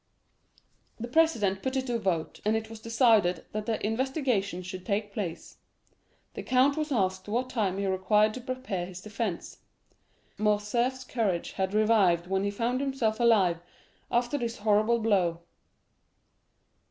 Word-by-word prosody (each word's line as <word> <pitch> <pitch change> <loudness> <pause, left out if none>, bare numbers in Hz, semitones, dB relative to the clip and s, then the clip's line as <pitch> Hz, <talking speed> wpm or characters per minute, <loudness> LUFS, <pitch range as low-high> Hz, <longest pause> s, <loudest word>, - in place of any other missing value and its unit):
The 235 - -4
president 240 -10 +2
put 260 0 -2
it 260 -1 0
to 245 - -3
the 235 - 0
vote, 175 -6 -2
and 215 +1 +2
it 220 0 -6
was 225 - -9
decided 220 -6 +3
that 215 +1 -4
the 225 -2 -1
investigation 225 - -1
should 185 0 -7
take 205 0 -2
place. 185 -6 -5 0.8
The - - -5
count 260 +2 +3
was 305 -1 -3
asked 190 -5 0
what 245 +4 -1
time 200 -6 0
he 200 - -1
required 205 +3 +2
to 255 - -7
prepare 255 -8 -4
his 185 -1 -9
defence. 210 -3 -4 0.8
Morcerf's 215 +5 0
courage 215 -9 -1
had 190 +1 -2
revived 205 -6 +3
when 190 +1 -1
he 200 - 0
found 235 +5 -1
himself 260 -6 -1
alive 195 -8 +3 0.5
after 240 +4 0
this 235 -1 -3
horrible 215 +2 +3
blow. 190 -7 +1
215 Hz, 150 wpm, -28 LUFS, 190-240 Hz, 0.8 s, decided